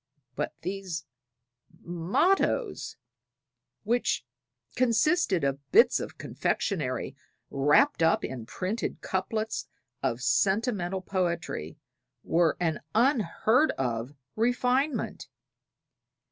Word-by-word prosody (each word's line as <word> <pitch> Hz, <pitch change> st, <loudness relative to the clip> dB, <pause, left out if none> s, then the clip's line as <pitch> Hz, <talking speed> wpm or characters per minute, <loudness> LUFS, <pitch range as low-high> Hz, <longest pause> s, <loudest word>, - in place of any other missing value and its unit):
But 150 Hz, -, -3 dB
these 185 Hz, -3 st, -4 dB, 0.7 s
mottoes, 335 Hz, -, 0 dB, 0.9 s
which 240 Hz, +3 st, 0 dB, 0.5 s
consisted 240 Hz, -, +2 dB
of 140 Hz, 0 st, 0 dB
bits 460 Hz, +3 st, +6 dB
of -, -, -7 dB
confectionery 135 Hz, -, -2 dB, 0.4 s
wrapped 145 Hz, -, +3 dB
up 165 Hz, 0 st, +3 dB
in 120 Hz, -4 st, -6 dB
printed 190 Hz, -, -3 dB
couplets 215 Hz, +4 st, -2 dB, 0.3 s
of -, -, -1 dB
sentimental 195 Hz, -3 st, +1 dB
poetry, 170 Hz, -, -2 dB, 0.5 s
were 165 Hz, -1 st, +2 dB
an 165 Hz, -4 st, 0 dB, 0.2 s
unheard 240 Hz, -, +3 dB
of 125 Hz, +1 st, -2 dB, 0.2 s
refinement. 250 Hz, +5 st, 0 dB
190 Hz, 80 wpm, -28 LUFS, 160-240 Hz, 0.9 s, bits